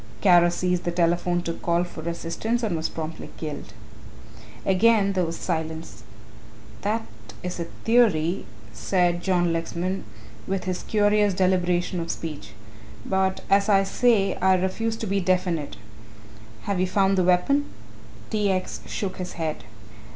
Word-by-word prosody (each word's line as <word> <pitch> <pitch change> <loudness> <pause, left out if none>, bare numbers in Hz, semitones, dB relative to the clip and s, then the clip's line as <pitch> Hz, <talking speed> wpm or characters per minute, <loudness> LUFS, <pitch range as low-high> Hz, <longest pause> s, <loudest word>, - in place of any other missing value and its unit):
Kara 175 -3 +6
seized 180 0 0
the 175 - -1
telephone 175 0 +1
to 165 - -2
call 170 +1 0
for 170 -2 -6
assistance 220 +8 -2
and 205 -6 0
was 160 0 -1
promptly 160 0 -6
killed." 150 -2 -6 0.9
Again 200 +1 +4
there 185 -2 +1
was 165 0 -4
silence. 160 - -4 0.8
"That 220 +3 -1 0.4
is 180 0 -4
a 170 - -2 0.2
theory," 200 -8 +3 0.3
said 175 -2 +1
John 175 -3 +2
Lexman, 175 +3 -2 0.4
with 190 -1 -1
his 185 -1 -3
curious 205 -2 +2
deliberation 180 -1 +1
of 165 0 -4
speech, 160 -3 -5 0.5
"but 190 0 0
as 200 +1 +3
I 195 -1 +5
say 200 0 +2
I 190 0 +4
refuse 220 +5 -1
to 225 - -4
be 200 -1 0
definite 180 - 0 0.9
have 200 -2 -1
you 185 - +2
found 195 +1 +2
the 185 - +2
weapon?" 185 +12 +3 0.7
T. 210 -2 +1
X. 185 -1 -2
shook 190 -2 -3
his 180 -1 -5
head. 160 -2 -4
185 Hz, 145 wpm, -25 LUFS, 170-195 Hz, 0.9 s, Kara